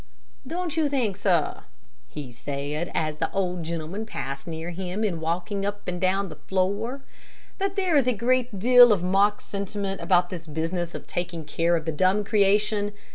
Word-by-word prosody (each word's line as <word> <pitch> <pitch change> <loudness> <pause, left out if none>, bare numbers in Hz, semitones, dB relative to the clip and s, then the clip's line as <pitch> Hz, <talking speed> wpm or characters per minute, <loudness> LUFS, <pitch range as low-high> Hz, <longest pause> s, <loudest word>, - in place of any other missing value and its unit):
"Don't 340 0 -3
you 310 -2 +2
think, 245 -8 0
sir," 180 -5 +1 0.5
he 140 -4 -7
said, 145 +6 -4
as 155 -1 0
the 160 - -1
old 180 -3 -1
gentleman 170 +6 -4
passed 140 -7 -5
near 165 +1 -4
him 185 +4 -3
in 185 -6 0
walking 175 +5 -2
up 205 +1 -4
and 180 -1 -3
down 190 +1 +2
the - - -10
floor, 200 +8 -1 0.6
"that 390 0 -1
there 375 -5 +1
is 275 -4 +4
a - - +5
great 245 0 +1
deal 245 +3 +8
of 195 -4 +2
mock 200 +3 +3
sentiment 200 0 -4
about 180 -2 +3
this 170 -3 -6
business 165 +3 -2
of - - -7
taking 175 -2 -4
care 165 +3 +1
of 160 -2 -2
the 160 - 0
dumb 185 +6 +2
creation? 205 0 +2
190 Hz, 180 wpm, -26 LUFS, 170-210 Hz, 0.6 s, deal